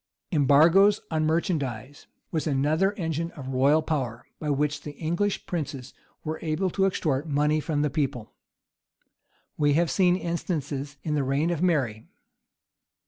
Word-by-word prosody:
Embargoes 165 +7 +5
on 155 -1 +1
merchandise 145 - -2 0.2
was 160 -1 -1
another 155 +7 +2
engine 165 -3 -2
of 135 -4 -8
royal 140 +5 +3
power, 125 -7 -3
by 150 - -3
which 145 +1 0
the 150 - -7
English 175 +7 -1
princes 140 -7 -5 0.3
were 155 0 -4
able 170 +4 -1
to 195 +1 +2
extort 155 -5 -1
money 150 +2 +2
from 150 -1 -1
the 150 - +1
people. 130 -7 -2 1.2
We 145 -1 +3
have 165 +2 +2
seen 180 -2 +3
instances 150 -5 -3
in 155 - -2
the 145 -2 +1
reign 140 +5 0
of 170 -2 -2
Mary. 135 -12 0
155 Hz, 140 wpm, -26 LUFS, 140-170 Hz, 1.2 s, Embargoes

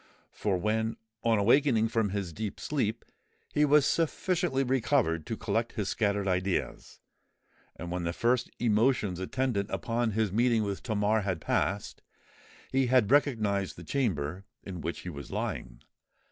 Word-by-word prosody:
For 100 -3 -1
when, 110 +4 -1 0.3
on 115 -1 +3
awaking 115 +1 +4
from 110 -2 +1
his 95 -4 -3
deep 105 +2 -5
sleep, 115 -6 -2 0.5
he 150 - +4
was 150 -1 +5
sufficiently 165 -2 +1
recovered 125 - +1
to 115 -1 -3
collect 115 +1 -1
his 105 -4 -2
scattered 100 -2 0
ideas,—and 90 -1 -5
when 90 0 -2
the 85 - -1
first 120 +7 +1
emotions 110 -4 +2
attendant 105 0 -1
upon 115 -1 -1
his 110 -2 +1
meeting 115 +1 +3
with 100 -2 -3
Tamar 110 -1 +1
had 95 -4 -2
passed,—he 105 +7 -3
had 125 -3 +3
recognised 110 -9 +2
the - - -10
chamber 95 - -1 0.2
in 90 -3 -7
which 85 - -4
he 90 - -6
was 70 -5 -8
lying. - - -4
110 Hz, 140 wpm, -29 LUFS, 95-125 Hz, 0.5 s, was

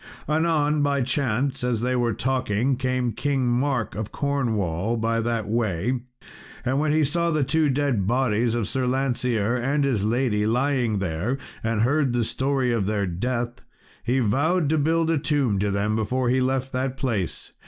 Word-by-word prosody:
Anon 155 -1 +2
by 140 -2 +1
chance, 130 0 -1
as 120 -3 0
they 125 +1 0
were 120 -1 +1
talking, 130 -1 0
came 130 -1 -1
King 135 +1 -1
Mark, 120 -2 0
of 105 +2 -5
Cornwall, 115 - -1
by 115 +1 0
that 115 -2 -1
way, 110 +1 0 0.7
and 130 +3 +1
when 150 0 +1
he 155 +1 +3
saw 170 +4 +1
the 155 -3 +1
two 150 +3 +2
dead 130 -8 0
bodies 120 -1 +1
of 115 -5 -1
Sir 130 -1 -1
Lancear 125 -4 0
and 135 +4 0
his 125 -8 +1
lady 110 -2 +1
lying 125 -2 +1
there, 95 +7 -2 0.3
and 110 -1 0
heard 135 +1 +2
the 120 -1 +1
story 130 +1 0
of 105 -5 0
their 105 -1 0
death, 120 +7 -3 0.4
he 125 +2 +1
vowed 145 - +1
to 160 0 +2
build 165 +2 +2
a 160 - +2
tomb 135 -9 +1
to 100 +1 0
them 100 +2 0
before 120 +3 0
he 130 +1 +2
left 130 +1 -1
that 130 +1 -2
place. 115 - -3
125 Hz, 175 wpm, -24 LUFS, 110-140 Hz, 0.7 s, he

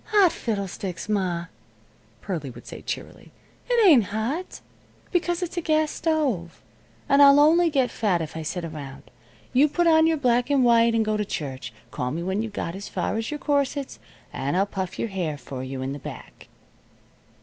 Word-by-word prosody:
"Hot 405 -5 +4
fiddlesticks, 195 -5 -4
ma," 185 -5 -1 0.8
Pearlie 165 -8 -4
would 125 - -12
say, - - -9
cheerily. - - -7 0.4
"It 475 -3 +4
ain't 265 - +7
hot, 230 - -3 0.5
because 350 0 0
it's 355 +1 -5
a - - +1
gas 310 -1 +1
stove. 275 - -1 0.5
And 280 +1 +5
I'll 280 0 +8
only 330 +3 +5
get 270 -5 +1
fat 200 -6 +1
if 160 -2 -5
I 160 - -4
sit 170 +2 -4
around. 145 -4 -9 0.4
You 280 +4 +5
put 345 +4 +1
on 320 -1 +5
your 325 -1 +2
black 245 -2 +2
and 280 -2 +3
white 230 -1 +5
and 225 -1 +2
go 215 0 0
to 210 - 0
church. 140 -9 -5 0.2
Call 125 - -2
me 165 +6 -3
when 190 +3 -1
you've 225 -1 -4
got 170 -4 -4
as 195 +2 -7
far 180 +2 -2
as 225 0 -2
your 300 - -3
corsets, 285 -1 -1 0.3
and 140 +6 -1
I'll 195 - +3
puff 190 -3 -5
your 230 - -2
hair 175 -6 -3
for 130 -2 -7
you 130 0 -5
in 135 +1 -3
the 145 - -7
back." - - -10
220 Hz, 190 wpm, -25 LUFS, -, 0.8 s, I'll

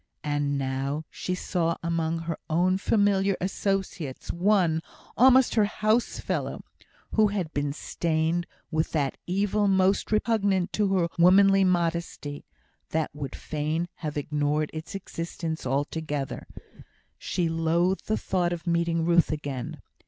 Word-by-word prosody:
And 145 -1 0
now 135 +3 -2
she 185 - -3
saw 170 -2 -1
among 165 -1 -1
her 165 -1 -4
own 180 +4 +2
familiar 200 -2 +2
associates 190 -7 -2
one, 175 -3 +2 0.3
almost 260 +1 +6
her 215 -2 +4
housefellow, 215 +3 -1 0.5
who 215 -1 +4
had 190 -6 -3
been 145 0 -1
stained 160 +3 -1 0.2
with 155 0 0
that 140 -4 0
evil 205 +3 +1
most 190 +1 +2
repugnant 205 -4 +1
to 205 -2 +1
her 175 -2 +2
womanly 195 +2 +6
modesty, 170 -5 -1 0.4
that 160 -1 -1
would 140 -2 -6
fain 155 +3 -2
have 150 -2 -4
ignored 150 +1 0
its 160 +4 -7
existence 165 -5 -4
altogether. 145 +1 -2 0.7
She 175 -2 -1
loathed 165 +3 +1
the 215 - +1
thought 180 -2 0
of 175 0 -6
meeting 170 -1 +1
Ruth 170 -1 +4
again. 145 -4 -4
170 Hz, 125 wpm, -27 LUFS, 155-190 Hz, 0.7 s, almost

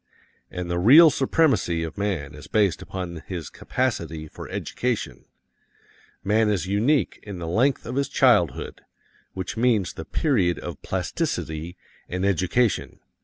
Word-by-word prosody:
And 90 -1 -5
the 85 0 -1
real 150 - +8
supremacy 130 - +1
of 80 -2 -6
man 90 -9 -2
is 75 0 -11
based 100 -5 +1
upon 90 -3 -6
his 85 -5 -6
capacity 85 - -2
for - - -10
education. 115 - -3 1.0
Man 105 +2 +2
is 95 -6 0
unique 110 - +1
in 100 -3 -8
the 85 - -5
length 125 +11 +1
of 120 - -5
his 140 -1 0
childhood, - - +2 0.5
which 95 +4 -5
means 115 -6 +2
the 80 - -7
period 100 - +1
of 85 -5 -7
plasticity 80 +2 -3 0.3
and 90 +2 -2
education. 100 +5 +1
95 Hz, 135 wpm, -24 LUFS, 85-120 Hz, 1.0 s, real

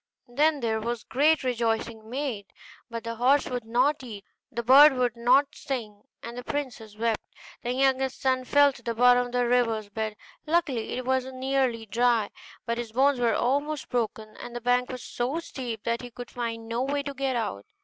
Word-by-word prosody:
Then 290 +4 +2
there 220 -2 0
was 235 0 -3
great 300 +3 +2
rejoicing 225 -2 -1
made; 245 -6 -3 0.4
but 230 -1 -5
the 230 -1 -5
horse 265 +4 +3
would 245 -3 -4
not 255 +6 +2
eat, 215 -6 -9 0.3
the 235 -2 -3
bird 275 +5 +8
would 250 -2 0
not 250 +4 +3
sing, 230 -8 -5 0.2
and 235 +1 -7
the 245 - -6
princess 240 -7 -5
wept. 225 -1 0 0.4
The 245 - -2
youngest 265 0 +1
son 260 -1 +1
fell 285 +1 +5
to - - -14
the 235 -1 -3
bottom 245 +1 +5
of - - -11
the 245 0 +1
river's 230 -4 +1
bed: 220 0 -3 0.3
luckily 300 -8 0
it 255 0 -4
was 260 0 0
nearly 260 -3 -1
dry, 230 -1 +1 0.3
but 235 0 -2
his 235 -2 -5
bones 270 +1 +3
were 235 -2 +2
almost 285 +3 -1
broken, 220 -2 -3
and 240 0 -9
the 240 - -4
bank 245 +1 +2
was 255 -1 -6
so 250 +6 -2
steep 245 -9 -6
that 235 0 -1
he 245 - -8
could 245 +1 -9
find 230 -2 -4
no 230 +2 -2
way 280 +2 -1
to 280 0 -5
get 270 -1 -1
out. 210 - -3
245 Hz, 195 wpm, -27 LUFS, 230-265 Hz, 0.4 s, bird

